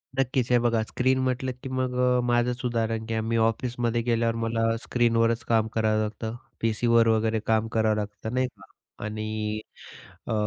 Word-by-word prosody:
नक्कीच. 130 -2 0
हे 125 - +6
बघा, 115 -2 +2
स्क्रीन 130 +4 +1
म्हटलं 130 0 -1
की 135 - -5
मग 130 -1 -1
अ, 125 0 +3
माझंच 120 +1 +1
उदाहरण 115 -2 -1
घ्या. 110 -1 -1
मी 115 +1 -1
ऑफिसमध्ये 120 +1 0
गेल्यावर 115 -1 +1
मला 115 0 0
स्क्रीनवरच 115 -1 +2
काम 110 -1 +3
करावं 110 -1 +2
लागतं. 110 +1 -4 0.3
पीसीवर 115 +1 +3
वगैरे 110 0 +2
काम 110 0 +2
करावं 110 -1 +2
लागतं 105 +2 -5
नाही 130 0 +1
का. - - -17 0.4
आणि 110 0 -3 0.7
अ, - - -1
115 Hz, 160 wpm, -26 LUFS, 110-120 Hz, 0.7 s, हे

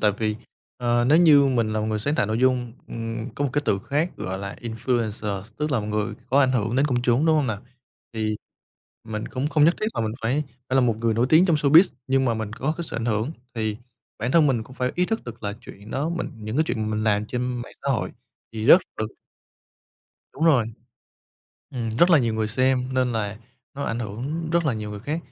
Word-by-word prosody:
Tại 105 - +4
vì, 110 -1 0 0.4
ờ, 120 -1 +1
nếu 150 +6 +5
như 150 -5 +7
mình 115 -5 +1
là 110 - 0
một 110 - -1
người 110 -1 -1
sáng 145 +8 0
tạo 105 - +1
nội 110 +2 -1
dung, 125 -2 +2 0.2
ừm, 115 +1 -4
có 145 - -1
một 140 - 0
cái 145 - +1
từ 100 - +2
khác 150 - -1
gọi 95 +1 -4
là 100 0 -6
influencer, 110 -4 -2
tức 150 +1 -2
là 120 - +2
một 105 - -5
người 105 0 -1
có 135 +3 +3
ảnh 130 -2 +3
hưởng 115 0 0
đến 140 - +3
công 125 -4 0
chúng, 125 +6 +2
đúng 160 - +4
hông 150 -3 +2
nào? 110 -4 -3 0.5
Thì 110 -1 -1 0.7
mình 110 -1 -5
cũng 135 +1 -2
không 150 -1 +3
nhất 170 +3 +5
thiết 215 - 0
là - - -1
mình 110 -1 -1
phải 130 +7 +1 0.3
phải 130 - -1
là - - +6
một 120 -4 +2
người 115 -1 +1
nổi 120 +3 +2
tiếng 160 +4 +6
trong 170 -4 +3
showbiz, 155 +5 +6
nhưng 135 0 +2
mà 120 -3 +2
mình 110 -1 -4
có 135 +6 -1
cái 170 - -4
sự 150 - -6
ảnh 115 - -2
hưởng, 110 +3 0 0.2
thì 110 -2 -1 0.4
bản 120 +4 -2
thân 165 -3 +6
mình 125 -5 +1
cũng 130 +3 -14
phải 125 0 -1
ý 180 +1 +1
thức 225 +2 -2
được 120 -1 -9
là 100 -1 -2
chuyện 100 +2 -12
đó 140 +6 -1
mình 170 0 -3
những 110 +2 -5
cái 155 - +3
chuyện 110 -2 -2
mình 110 0 -1
làm 105 -1 +2
trên 125 +2 -2 0.2
mạng - - -11
xã 140 - -2
hội 125 - -1 0.4
thì 110 -1 -4
rất 170 +9 +8 0.2
được 110 - -1 1.3
Đúng 155 - -2
rồi, 135 -9 +4 1.0
ừm, 120 -3 -3
rất 130 +11 +3
là 165 - +7
nhiều 115 -4 0
người 110 0 0
xem, 130 +3 +1
nên 130 -1 +1
là, 105 -2 -2 0.4
nó 140 +1 -4
ảnh 115 - -2
hưởng 130 +10 -4
rất 170 0 +2
là 145 - +2
nhiều 105 -1 -5
người 105 -1 -7
khác. 145 +8 -2
120 Hz, 245 wpm, -24 LUFS, 110-140 Hz, 1.3 s, rất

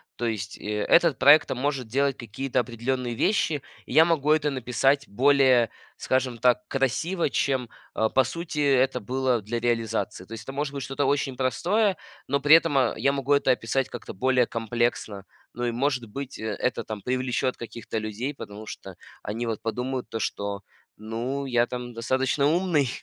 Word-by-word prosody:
То 120 - -3
есть, 105 -3 -3
э, 105 0 -3
этот 170 -7 +5
проект 145 +3 +7
там 125 - -3
может 135 -4 -1
делать 140 +3 0
какие-то 125 +3 -2
определенные 120 +1 -2
вещи, 155 - +1 0.2
и - - -8
я 160 - +8
могу 155 -3 +1
это 155 -1 +3
написать 135 +2 +1
более, 130 0 +4 0.3
скажем 130 -2 -1
так, 125 +1 +2
красиво, 150 +6 0
чем, 130 -5 0 0.3
э, 110 0 +2
по 130 - +5
сути 165 +3 -6
это 135 -2 +3
было 125 0 0
для 120 +3 -3
реализации. 115 -5 -1
То 115 - -22
есть 110 0 -7
это 135 - -7
может 145 0 -3
быть 140 - -4
что-то 135 +2 -2
очень 135 -2 0
простое, 185 - +1 0.3
но 140 +1 +1
при 145 +3 +7
этом, 165 -3 +3
э, 125 - +2
я 135 +5 +2
могу 140 0 -3
это 140 -2 +3
описать 125 +2 0
как-то 120 - -8
более 125 +2 +2
комплексно. 115 -3 -2 0.3
Ну 120 0 -3
и 120 - 0
может 125 0 0
быть, 135 +3 -7
э, 110 - -5
это 125 - -1
там 105 -3 -7
привлечет 130 0 -1
каких-то 115 -1 -6
людей, 110 +7 -4
потому 105 -4 -9
что 95 -3 -9 0.3
они 115 +3 -4
вот 115 -2 -3
подумают 125 +3 -3
то, 115 - -4
что 100 -1 -3 0.4
ну 120 +6 -4
я 120 -2 +2
там 125 -1 -6
достаточно 130 +4 +1
умный. 160 -5 +2
130 Hz, 180 wpm, -26 LUFS, 115-140 Hz, 0.4 s, я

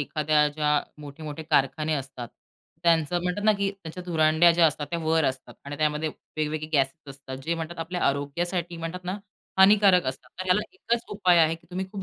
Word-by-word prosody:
एखाद्या 150 +1 +2
ज्या 150 0 -1 0.3
मोठे-मोठे 150 +1 -8
कारखाने 155 +1 +1
असतात 135 -4 -6 0.5
त्यांचं 170 0 +2
म्हणतात 180 +3 -2
ना 215 - +6
की 200 0 0
त्यांच्या 180 -3 -9
धुरांड्या 160 0 +4
ज्या 170 0 +5
असतात 150 -1 -2
त्या 170 - -1
वर 160 0 +2
असतात. 130 0 -3
आणि 145 +1 -6
त्यामध्ये 155 0 0 0.3
वेगवेगळे 155 0 -2
गॅसेस 135 +1 +1 0.2
असतात. 135 -1 -9
जे 165 +4 -1
म्हणतात 165 +1 -6
आपल्या 175 +2 -4
आरोग्यासाठी 170 +5 -2
म्हणतात 165 +2 -6
ना, 185 +2 -3 0.4
हानिकारक 195 -2 +6
असतात. 130 0 -5
तर - - -3
ह्याला 185 +2 +3
एकच 235 -11 -2
उपाय 185 -4 +4
आहे 160 0 +4
की 165 +1 -17
तुम्ही 185 +1 -3
खूप 195 -2 -6
160 Hz, 185 wpm, -26 LUFS, 150-180 Hz, 0.5 s, ना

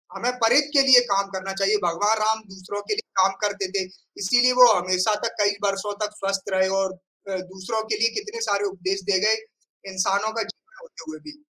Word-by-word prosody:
हमें 245 +2 -1
परित 275 +6 +4
के 275 - +6
लिए 255 -2 +9
काम 195 0 +1
करना 190 +1 -5
चाहिए। 195 +2 +1
भगवान 205 +6 +1
राम 220 +1 +1
दूसरों 190 +2 -7
के - - +2
लिए 435 - -5
काम 190 +1 +4
करते 205 -2 -1
थे। 195 -1 -1 0.4
इसीलिए 245 +5 +4
वो 250 - +11
हमेशा 185 +4 +1
तक - - -2
कई 205 0 +3
बरसों 200 +1 -1
तक 210 0 -9
स्वस्थ 195 0 -3
रहे 190 0 +2 0.2
और 190 0 -5 0.3
अ, 190 - -2
दूसरों 190 +4 -5
के 215 - +1
लिए 230 +1 +3
कितने 420 +2 -5
सारे 205 - 0
उपदेश 195 0 -3
दे 190 - +3
गए। 215 +3 +3 0.6
इंसानों 195 +3 0
का 225 0 -1
जीवन 440 - -14
होते 295 - -13
हुए 155 - -10
भी। 300 - -14
200 Hz, 205 wpm, -23 LUFS, 190-225 Hz, 0.6 s, वो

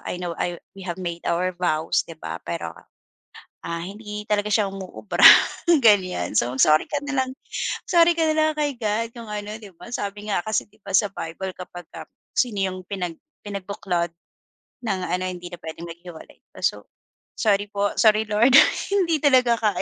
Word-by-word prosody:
I 180 - -3
know, 175 -2 -4
I 175 -1 -2 0.2
we 195 - -9
have 175 +1 -4
made 170 -1 -4
our 180 +1 0
vows 160 -3 0
'di 165 - -10
ba, - - -5
pero, 85 -1 -5 0.9
ah, 170 0 -3
hindi 210 +2 -7
talaga 210 0 +1
siya 210 -1 +3
umuubra," 195 +2 0 0.6
ganyan. 185 - +3
So, 120 +1 +1
sorry 155 0 +5
ka 290 - -1
na 275 -2 0
lang 255 - -8 0.6
sorry 340 -1 +5
ka 325 - +2
na 310 - +1
lang 310 0 +3
kay 290 -2 0
God 220 0 -1
kung 230 -2 -9
ano, 210 0 -5
'di 205 -3 -12
ba. - - -11
Sabi 205 0 -4
nga 175 - +1
kasi, 215 -1 0
'di 215 - -26
ba, 200 - -7
sa 205 - +4
Bible 185 +2 -5
kapagka, 175 -2 -10 0.3
sino 225 -6 +1
yung 185 -1 -1
pinag 180 -5 -4 0.3
pinagbuklod 190 -4 -3 0.7
ng 195 -3 -1
ano, 180 +1 -1
hindi 175 -1 -6
na 175 - -7
puwedeng 165 +1 -8
maghiwalay 170 0 -11 0.2
pa. - - -12
So, - - -1 0.5
"Sorry 205 -2 +2
po, 200 0 0
sorry 215 0 +5
Lord. 230 +5 +4 0.4
Hindi 340 -5 +2
talaga 255 -5 +4
kaya," 210 -5 +1
200 Hz, 180 wpm, -23 LUFS, 175-215 Hz, 0.9 s, sorry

